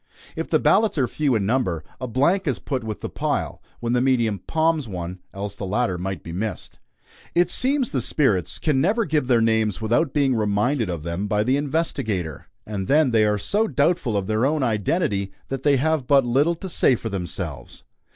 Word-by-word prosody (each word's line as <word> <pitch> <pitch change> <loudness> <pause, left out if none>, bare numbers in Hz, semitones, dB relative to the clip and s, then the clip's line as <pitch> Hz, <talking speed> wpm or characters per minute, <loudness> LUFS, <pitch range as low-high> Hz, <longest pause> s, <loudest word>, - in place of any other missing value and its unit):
If - - -3
the - - +4
ballots 215 -6 +3
are 130 -3 +2
few 145 -3 0
in 100 -3 0
number, 100 -9 0 0.2
a 130 - -4
blank 155 - +1
is 135 - 0
put 130 -4 -3
with 110 -1 -5
the - - -3
pile, - - -2 0.2
when 120 0 -1
the 125 - +2
medium 120 -6 +1
"palms" 160 - 0
one, 90 -2 -6
else 100 0 -5
the 100 - -8
latter 95 -3 0
might 95 -2 -4
be 85 - -8
missed. 105 +5 -5 0.6
It 175 0 +3
seems 265 -1 +1
the 130 - 0
spirits 110 - +1
can 145 -4 +1
never 215 - +2
give 150 -5 0
their 120 -3 +4
names 110 -3 +1
without 120 +7 +1
being 140 -3 +2
reminded 110 +2 0
of 85 -4 -4
them 85 +5 -3
by 105 0 +1
the 130 +4 +2
investigator, 120 - -2 0.2
and 100 -3 -4
then 150 -2 +4
they 110 -2 +4
are 105 0 +1
so 210 - 0
doubtful 145 - +1
of 100 - -1
their 110 +3 0
own 145 +1 +1
identity 105 - 0 0.2
that 135 -1 -3
they 140 0 +3
have 155 -1 0
but 140 -2 +5
little 140 +8 +2
to 190 - -7
say 145 -6 +4
for 115 - -5
themselves. 85 - -5
120 Hz, 200 wpm, -23 LUFS, 100-150 Hz, 0.6 s, but